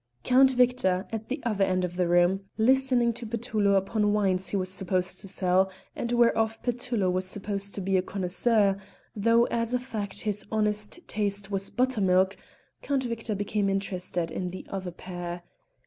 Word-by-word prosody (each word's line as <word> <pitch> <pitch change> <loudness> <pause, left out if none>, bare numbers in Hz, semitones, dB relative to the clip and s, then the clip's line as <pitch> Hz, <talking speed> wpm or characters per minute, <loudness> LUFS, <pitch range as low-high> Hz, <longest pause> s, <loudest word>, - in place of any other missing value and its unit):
Count 260 +1 +6
Victor, 250 -8 +2
at 220 -1 -5
the 265 +4 -2
other 210 -4 +1
end 185 -1 +1
of 175 0 -6
the 180 -1 +1
room, 175 +3 +3
listening 250 0 +3
to 240 - -5
Petullo 215 -3 +1
upon 205 +2 +1
wines 190 -3 +1
he 200 - 0
was 185 -1 -1
supposed 185 -1 -1
to - - -7
sell 190 0 +2 0.3
and 235 - -3
whereof 225 -2 +2
Petullo 245 -4 -1
was 185 +1 0
supposed 200 +1 -3
to 200 - -4
be 190 0 +1
a - - +3
connoisseur, 195 +2 +1 0.4
though 230 +3 +4
as 230 +1 0
a - - +1
fact 215 -6 -5
his 210 -1 -2
honest 210 +8 -1
taste 205 -1 -2
was 195 0 -1
buttermilk 195 -7 +2 0.5
Count 275 -2 0
Victor 230 -3 -3
became 205 0 0
interested 185 -3 -2
in 180 -1 -3
the 185 - -8
other 190 -2 -4
pair. 175 0 -7
200 Hz, 170 wpm, -27 LUFS, 185-230 Hz, 0.5 s, Count